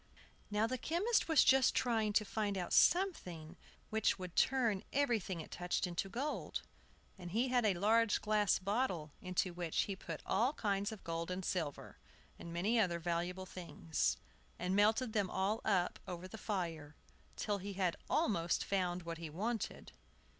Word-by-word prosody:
Now 210 +1 +2
the 255 +2 -2
chemist 390 - +1
was 320 -4 +6
just 265 0 +5
trying 225 -4 +2
to 215 0 +3
find 205 -1 -1
out 180 -2 -3
something 180 - +2 0.4
which 220 0 +2
should 180 -2 -7
turn 235 -7 +2
everything 225 -11 0
it - - -11
touched 180 +2 -1
into 180 +2 -3
gold; 275 +9 -3 0.6
and 175 -1 -7
he 235 +8 +1
had 245 -2 +2
a 195 - +2
large 220 +4 +3
glass 210 -1 +2
bottle 190 - -1
into 185 0 -1
which 170 -2 0
he 200 - -2
put 165 -4 -7
all 240 +8 +2
kinds 200 -4 -1
of 220 - -9
gold 165 0 -3
and 185 0 -3
silver, 160 -6 -3 0.4
and 170 - -8
many 200 +8 +1
other 180 -5 +2
valuable 175 +2 -2
things, 170 -3 -2 0.4
and 180 +2 -1
melted 220 +3 +3
them 205 -3 +1
all 205 +5 0
up 190 -5 +1
over 180 0 -5
the 185 - -9
fire, 165 -8 -3 0.4
till 205 -2 -1
he 200 +2 -5
had 185 -3 0
almost 170 -5 +1
found 180 -2 0
what 165 -1 -5
he 165 -2 -5
wanted. 215 +8 -3
195 Hz, 165 wpm, -36 LUFS, 175-220 Hz, 0.6 s, was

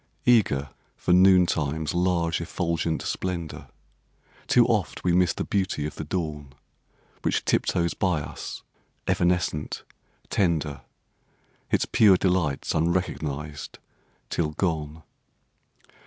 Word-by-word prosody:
Eager 70 - +3 0.3
for 90 - +1
noon 90 0 +7
time's 80 -2 -1
large 85 -2 +1
effulgent 85 -1 -1
splendour, 85 -4 -4 0.8
Too - - +5
oft - - -1
we 90 - +2
miss 90 -1 +4
the - - -3
beauty 95 -7 -1
of 75 - -4
the - - -6
dawn, 75 -4 -4 0.7
Which - - 0
tiptoes 85 -2 +1
by 90 -5 +1
us, - - -7 0.4
evanescent, 85 -4 0 0.5
tender, 80 -6 0 0.9
Its - - +2
pure 100 -4 +5
delights 90 -7 0
unrecognised 80 -3 -2 0.5
till 75 -3 -1
gone. 80 -2 -2
85 Hz, 105 wpm, -26 LUFS, 75-90 Hz, 0.9 s, noon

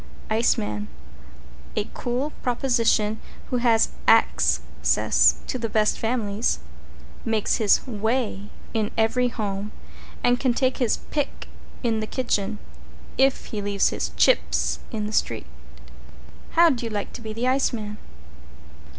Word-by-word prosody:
=ICEMAN= 105 - +1 0.9
A 210 - +1
cool 250 +5 -2
proposition 235 -4 +1 0.3
who 250 - +2
has 235 -2 +3 0.2
Axe - - +4 0.2
cess - - +4
to 255 - -3
the 230 -1 -2
best 215 0 +2
families, 225 -2 0 0.7
makes 220 -2 +1
his 215 -3 +3
Weigh 220 -3 -2 0.2
in 215 -2 0
every 225 +3 +2
home 210 -3 -3 0.5
and 245 0 +3
can 255 -3 +1
take 260 -1 +1
his 245 -4 +1
Pick 290 -2 -2 0.4
in 225 -2 +1
the 215 - -3
kitchen, 215 -5 -1 0.6
if 270 0 +3
he 210 - -2
leaves 200 -1 +2
his - - -3
Chips - - +2
in 215 -2 -2
the 210 - -5
street. - - 0 1.1
"How'd 330 -7 +5
You 230 - -3
Like 205 -2 -4
to - - -8
be 220 -1 -6
The 230 +3 -2
Iceman?" 235 -5 0
225 Hz, 130 wpm, -24 LUFS, 210-250 Hz, 1.1 s, How'd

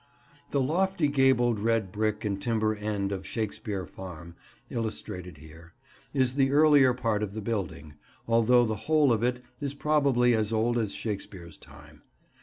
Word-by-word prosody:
The 140 - 0
lofty 175 +3 +1
gabled 130 -5 +3
red 110 -3 0
brick 110 +1 -1
and 100 -1 -2
timber 110 -1 +1
end 105 -2 -3
of 95 -1 -4
Shakespeare 105 -3 -4
Farm, 85 -2 -10 0.3
illustrated 90 -7 -5
here, 80 +3 -15 0.4
is 130 -3 +1
the 135 -1 +2
earlier 145 -3 +5
part 115 -4 -1
of 105 -2 -3
the - - -3
building, 95 -9 -4 0.3
although 115 +1 +4
the 110 -1 -2
whole 150 -5 +4
of 110 - -1
it 125 +1 -1 0.2
is 140 -1 -3
probably 140 -5 +2
as 110 -1 0
old 115 +2 +1
as 110 -3 -2
Shakespeare's 95 -5 -6
time. - - -15
115 Hz, 155 wpm, -28 LUFS, 100-130 Hz, 0.4 s, earlier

